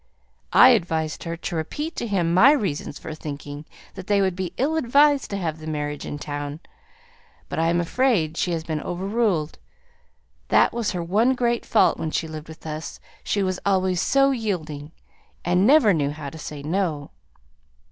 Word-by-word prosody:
I 255 - +8
advised 165 -10 0
her 165 0 -4
to 170 - -5
repeat 295 - -4
to 235 - -2
him 175 -5 0
my 240 +11 +7
reasons 180 - -2
for 160 - -7
thinking 145 -1 -7 0.3
that 185 - -9
they 205 -1 +3
would 190 -2 +1
be 185 -1 -3
ill 290 +5 +1
advised 285 0 +3
to 200 - -3
have 160 -4 -3
the 155 - -9
marriage 145 -1 -4
in 145 - -5
town; 145 0 -5 0.9
but - - -3
I 165 - +2
am 170 +1 +2
afraid 175 -4 +1
she 180 - -1
has 165 -2 -2
been 155 -2 -3
overruled. 190 -3 -1 0.9
That - - +4
was 230 -3 -1
her 175 -2 -3
one 220 +9 +2
great 240 -1 0
fault 220 - +3
when 160 - -2
she 160 - -2
lived 155 0 -8
with 160 0 -13
us; 155 0 -6 0.2
she 205 - 0
was 185 -1 -1
always 185 -2 +1
so 275 0 +3
yielding, 160 - -3 0.5
and 180 +4 +3
never 270 -8 +6
knew 145 -4 0
how 145 -1 -6
to 160 - -10
say 150 -1 -7
'No.'" 155 -3 -2
175 Hz, 180 wpm, -23 LUFS, 155-215 Hz, 0.9 s, I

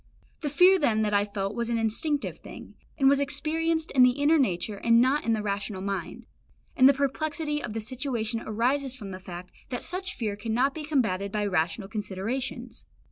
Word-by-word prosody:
The 295 - -2
fear 365 +6 +6
then 220 -8 +2
that 210 -1 0
I 205 0 +3
felt 200 -1 -3
was 235 +1 -2
an 235 - +1
instinctive 230 +7 -1
thing, - - -11 0.2
and 270 - +4
was 280 0 +5
experienced 315 +3 0
in 265 - +4
the 250 0 +7
inner 305 +3 +4
nature 200 -3 0
and 230 +3 +4
not 265 +5 +2
in 230 - +2
the 215 -1 -1
rational 200 -1 -3
mind; 195 -4 -4 0.5
and 260 +1 +7
the - - +6
perplexity 295 +2 -1
of 220 - -5
the 225 - -3
situation 235 -1 -2
arises 255 +5 0
from 205 -6 -8
the 185 - -7
fact 180 -1 -9 0.2
that 245 - -4
such 370 +2 -4
fear 215 -4 -2
cannot 230 +6 0
be 310 -1 -6
combated 200 -10 0
by 210 -1 -1
rational 180 +1 0
considerations. 230 +4 -4
235 Hz, 190 wpm, -27 LUFS, 205-280 Hz, 0.5 s, the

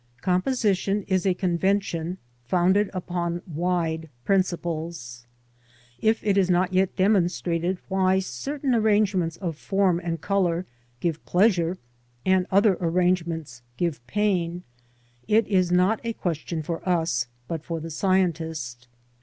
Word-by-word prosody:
Composition 195 - +1
is 190 0 +1
a 185 - +2
convention 180 -1 0 0.3
founded 185 - +3
upon 175 -2 -3
wide 165 -1 -1 0.2
principles. 165 -10 -2 0.7
If 220 0 +1
it 200 -1 +3
is 185 -1 +2
not 180 +1 +2
yet 190 0 +2
demonstrated 180 -2 +1
why 190 -1 +2
certain 260 - -2
arrangements 205 -7 +2
of 170 -5 -3
form 185 +1 +1
and 165 -1 -2
colour 180 -1 0 0.4
give 165 -2 -1
pleasure, 180 -2 +3 0.5
and 185 -1 +3
other 200 -1 +4
arrangements 170 -6 0 0.2
give 170 -7 -1
pain, 180 -2 0 0.6
it 220 +1 +4
is 185 -3 +2
not 185 +5 +3
a 230 -1 -2
question 165 -3 -3
for 165 +2 -4
us, 160 -9 +1 0.2
but 160 -2 -4
for 165 -1 -4
the 165 +1 -7
scientist. 160 -9 -1
180 Hz, 120 wpm, -25 LUFS, 165-195 Hz, 0.7 s, other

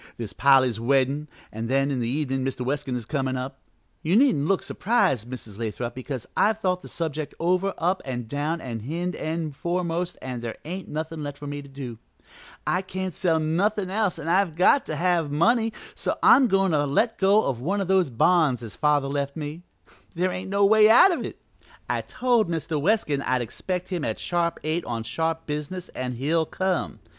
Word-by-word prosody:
There's 115 -3 -5
Polly's 130 -4 +4
weddin' 135 +4 +1 0.2
an' 110 +1 -4
then 135 +3 +1
in 130 - -1
the 115 - -1
evenin' 135 -1 -1
Mr. 130 -1 -3
Weskin 135 -1 -2
is 120 -2 -4
comin' 130 -1 -1
up. 130 +1 -5 0.4
You 165 +5 +1
needn't 210 - +4
look 195 0 +1
surprised, 135 - +1
Mrs. 115 -5 -7
Lathrop, 120 +1 -3
because 130 -1 -5
I've 215 0 +3
thought 180 -3 0
the - - -10
subject 155 -3 -4
over 185 +3 +1
up 180 +3 0
an' 125 -2 -4
down 145 +7 -2
an' 115 -3 -5
hind 170 +10 -3
end 155 -2 -3
foremost 175 +1 -2
an' 125 -2 -5
there 115 -1 -5
ain't 180 +3 -5
nothin' 160 +1 -4
left 145 -1 -5
for 145 - -9
me 145 0 -4
to 140 - -13
do. 135 -5 -8 0.7
I 180 - +1
can't 190 -1 -4
sell 165 -2 +1
nothin' 185 +5 0
else 205 -2 0
an' 155 - -7
I've 180 -1 +2
got 185 - +4
to 155 - -3
have 170 -1 +1
money, 225 +9 +3 0.2
so - - -2
I'm 265 -2 +7
goin' 195 -2 +2
to 145 -2 +2
let 225 - +1
go 200 +3 +5
of 120 -3 -2
one 195 +9 0
of 195 - -1
those 190 -5 +3
bonds 140 0 +3
as 110 - -7
father 150 -2 +2
left 140 +1 -2
me. 155 +2 -5 0.5
There 180 +2 +1
ain't 185 +1 -5
no 200 0 +3
way 215 +1 +6
out 245 +12 +8
of - - -3
it; - - -6 0.5
I - - 0
told 245 -6 +1
Mr. 160 -2 -2
Weskin 150 -6 +1
I'd 130 -2 0
expect 180 - -4
him 180 -5 -2
at - - -2
sharp 170 -1 -1
eight 160 +2 -1
on 115 -2 -3
sharp 160 +7 -2
business 150 +5 -4
an' 125 0 -4
he'll 155 +6 0
come. 185 -1 -2
155 Hz, 200 wpm, -25 LUFS, 135-185 Hz, 0.7 s, out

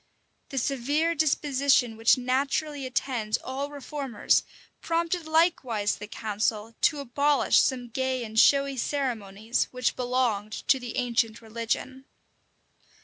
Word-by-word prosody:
The 275 - -6
severe 285 +6 0
disposition 280 -5 +2
which 225 +3 +4
naturally 275 +3 -1
attends 245 -4 -1
all 275 +2 -5
reformers 280 -4 0 0.4
prompted 335 0 -1
likewise 275 - +1
the 210 - -8
council 215 +1 -2
to 295 -3 +2
abolish 280 +2 +3
some 250 -2 +1
gay 260 +1 -2
and 220 -1 -1
showy 275 +1 +4
ceremonies 230 -5 -1
which 250 -1 -1
belonged 245 -4 -1 0.2
to 270 - +5
the 245 -2 -6
ancient 235 -2 0
religion. 230 +4 -4
255 Hz, 115 wpm, -27 LUFS, 230-280 Hz, 0.4 s, to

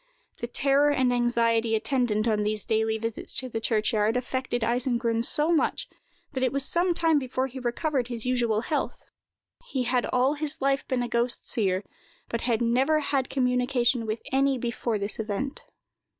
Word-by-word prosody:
The 235 - -3
terror 275 +4 +3
and 260 -3 +2
anxiety 230 -2 +2
attendant 230 -2 0
on 215 -2 +2
these 210 0 -1
daily 220 0 +1
visits 230 0 -2
to 255 - -1
the 225 - -3
churchyard, 220 0 +1
affected 250 -1 -2
Eisengrun 235 -1 0
so 300 +6 +3
much, 330 - +1 0.5
that 260 - -2
it 255 -2 +2
was 275 -1 -1
some 345 +3 +1
time 325 -3 +3
before 260 0 -2
he 265 0 -7
recovered 255 +1 -1
his 235 -2 -4
usual 235 -4 +1
health. 295 +5 -3 0.6
He 260 - -1
had 250 0 0
all 255 +3 +2
his 305 +1 -2
life 275 0 0
been 250 -2 0
a - - -2
ghost 235 +1 -1
seer, 195 -3 +1 0.5
but 230 - -2
had 235 -1 0
never 265 +7 +2
had 275 -3 -1
communication 250 -2 +1
with 215 +1 -3
any 270 0 +2
before 235 -2 -2
this 200 +2 -4
event. 220 +6 -3
245 Hz, 170 wpm, -26 LUFS, 230-270 Hz, 0.6 s, terror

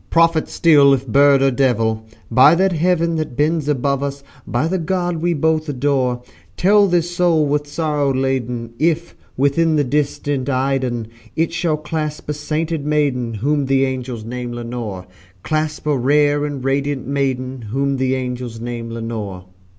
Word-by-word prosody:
prophet 165 -1 +3
still 145 -4 +5
if 135 0 -6
bird 140 +2 +5
or 135 - +3
devil! 115 -4 +1 0.3
By 130 +7 +7
that 190 +2 +2
Heaven 170 0 +1
that 155 -6 -4
bends 150 0 +1
above 140 -1 0
us 140 0 -4 0.2
by 125 +7 0
that 170 -2 -2
God 175 -2 0
we 170 +1 0
both 155 +1 0
adore, 130 -3 0 0.3
Tell 205 +2 +5
this 175 -1 0
soul 170 -3 +3
with 145 +1 -1
sorrow 150 -2 0
laden, 125 -3 -2
if, 165 +2 0 0.2
within 155 +4 +2
the 150 - +3
distant 145 0 -1
Aidenn, 130 -3 0 0.3
It 165 +1 0
shall 170 -3 0
clasp 150 0 -4
a - - +1
sainted 155 +1 -2
maiden 140 -6 0
whom 140 +5 0
the 135 0 +3
angels 125 -4 -4
name 120 +1 -5
Lenore 115 -6 -5 0.4
Clasp 155 -1 -2
a 150 -1 +2
rare 145 +3 +2
and 145 -3 -5
radiant 140 0 -1
maiden 130 -2 -2
whom 140 +3 0
the 130 0 +1
angels 125 -3 -4
name 120 0 -5
Lenore." 110 -5 -5
140 Hz, 160 wpm, -19 LUFS, 125-155 Hz, 0.4 s, By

